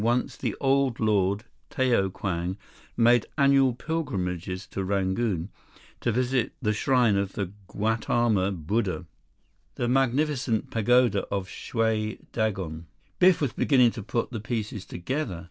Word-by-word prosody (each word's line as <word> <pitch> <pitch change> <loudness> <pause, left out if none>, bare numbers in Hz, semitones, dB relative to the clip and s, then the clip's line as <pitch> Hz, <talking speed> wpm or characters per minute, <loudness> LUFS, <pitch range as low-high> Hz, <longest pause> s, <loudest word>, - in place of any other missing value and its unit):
Once 120 +2 +1
the - - -3
Old 135 -2 +2
Lord, 100 -2 +2 0.3
Tao 120 -7 +2
Kwang, 90 -1 -3 0.4
made 120 0 +4
annual 140 -2 +4
pilgrimages 95 - -3
to 95 - -4
Rangoon 95 -1 0 0.5
to 120 - 0
visit 125 +1 0
the 110 -5 0
shrine 120 -2 +3
of 100 0 -1
the 95 -3 -3 0.2
Gautama 110 -1 +1
Buddha, 95 +2 -2 0.7
the 120 - -1
magnificent 135 -2 +1
pagoda 120 -2 +3
of 100 -2 -3
Shwe 110 0 -1
Dagon." 95 -8 -2 0.3
Biff 185 -2 +5
was 140 -5 0
beginning 125 -5 +4
to 110 - -7
put 115 +4 -2
the 115 - -4
pieces 110 -3 -4
together. 100 - -3
110 Hz, 130 wpm, -26 LUFS, 95-125 Hz, 0.7 s, Biff